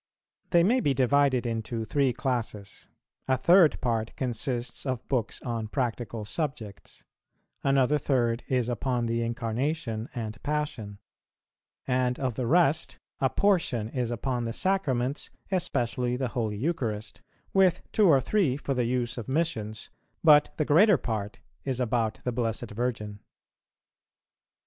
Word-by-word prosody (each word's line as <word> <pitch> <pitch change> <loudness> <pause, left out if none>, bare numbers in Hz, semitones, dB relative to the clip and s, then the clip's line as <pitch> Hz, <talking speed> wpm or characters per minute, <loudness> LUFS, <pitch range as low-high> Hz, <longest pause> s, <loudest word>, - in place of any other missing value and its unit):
They 170 -2 +5
may 235 +8 +3
be 140 - +1
divided 130 0 +3
into 115 0 -3
three 135 +3 +2
classes: 110 -6 -4 0.4
a 130 -1 +2
third 170 +4 +5
part 115 -2 -1
consists 125 -1 -3
of 130 -3 -3
books 120 -5 -1
on 115 -3 -3
practical 115 -3 -3
subjects; 110 - -5 0.6
another 135 +1 +3
third 120 -4 0
is 125 -3 +1
upon 120 0 -1
the 115 0 0
Incarnation 115 +1 -2
and 110 -2 -5
Passion; 145 -9 -3 0.9
and 125 -1 +1
of 130 -3 -1
the 120 +2 -2
rest, 160 +1 +2 0.2
a 135 - +2
portion 165 - +1
is 125 -1 -2
upon 120 +1 -2
the 115 - -3
Sacraments, 140 -8 0 0.2
especially 125 -9 0
the 130 -1 -2
Holy 110 -3 -2
Eucharist, 115 -7 -3 0.3
with 190 -3 +3
two 210 -3 +4
or 145 -5 +6
three 140 -1 +1
for 140 -1 -2
the 125 -2 0
use 120 0 -1
of 115 - -7
Missions, 115 -8 -2 0.3
but 150 -3 +7
the 155 - +1
greater 180 +6 +6
part 105 -5 -4 0.2
is 130 -2 -2
about 115 -3 0
the 125 - -1
Blessed 115 -1 -2
Virgin. 105 -2 -3
125 Hz, 135 wpm, -28 LUFS, 115-140 Hz, 0.9 s, but